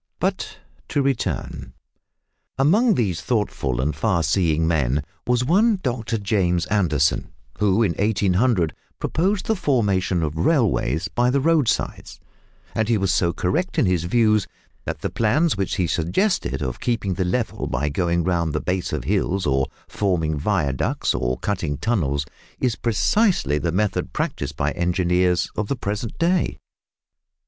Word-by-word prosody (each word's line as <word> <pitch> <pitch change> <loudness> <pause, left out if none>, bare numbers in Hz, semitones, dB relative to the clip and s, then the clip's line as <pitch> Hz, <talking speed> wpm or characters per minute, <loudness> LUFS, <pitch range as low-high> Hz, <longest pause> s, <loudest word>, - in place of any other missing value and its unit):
But - - -2 0.3
to 140 - 0
return. 135 -3 -2 0.8
Among 200 - +4
these 95 -9 0
thoughtful 80 - -1
and 75 +4 0
far 95 -7 +1
seeing 80 +1 +1
men 70 -4 +1 0.2
was 125 0 +2
one 205 - +3
Dr 120 -2 -1
James 95 -5 +1
Anderson, 80 -8 +1 0.3
who 105 +1 +3
in 100 - +2
1800 100 -2 +1 0.2
proposed 190 +4 0
the 220 - +1
formation 100 - +1
of 75 -1 -2
railways 90 - +1
by 120 +1 +1
the 140 +2 +2
roadsides, 155 -3 0 0.5
and 110 0 0
he 115 - +3
was 95 -2 +1
so 85 -2 +2
correct 160 - -1
in - - +4
his 90 -3 +1
views 110 +1 +2 0.4
that - - -4
the - - -2
plans 135 +8 +2
which 95 -1 -2
he 90 - +1
suggested 85 - 0
of 65 -2 -4
keeping 115 -6 -1
the 95 - -1
level, 110 +6 -2
by 75 - -1
going 85 +3 0
round 85 -3 0
the 75 - 0
base 90 0 -2
of - - -2
hills, 95 +3 0
or 65 -2 +1 0.2
forming 85 -6 0
viaducts, 75 -4 0
or - - -1
cutting 85 -8 -2
tunnels, 70 - 0 0.3
is 125 -4 +1
precisely 115 - +1
the 85 - -1
method 105 +4 -1
practised 70 +1 -3
by 70 0 0
engineers 90 +1 +1
of 105 - -2
the 140 - -1
present 105 -1 -4
day. 175 +1 +1
95 Hz, 150 wpm, -22 LUFS, 80-120 Hz, 0.8 s, Among